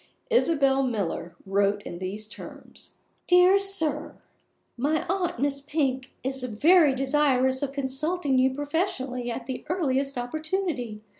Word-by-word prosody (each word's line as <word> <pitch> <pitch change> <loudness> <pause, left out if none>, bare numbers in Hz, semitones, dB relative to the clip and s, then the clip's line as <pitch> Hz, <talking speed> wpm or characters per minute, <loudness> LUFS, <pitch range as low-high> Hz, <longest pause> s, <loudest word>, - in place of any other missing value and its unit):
Isabel 280 - +3
Miller 200 -8 -2
wrote 200 +1 +1
in 175 - -7
these 200 +3 -5
terms: 220 - -10 0.3
"Dear 360 +2 +6
Sir 320 -7 0 0.6
My 295 +5 0
aunt, 360 -8 -1
Miss 280 +1 0
Pink, 270 -3 -1
is 265 0 -3
very 285 - +4
desirous 265 -1 +2
of 280 -2 -2
consulting 280 +1 0
you 260 +1 +3
professionally 280 -4 -2
at 235 +1 -5
the 260 +1 -5
earliest 275 -6 0
opportunity. 275 - -3
270 Hz, 125 wpm, -26 LUFS, 250-315 Hz, 0.6 s, Dear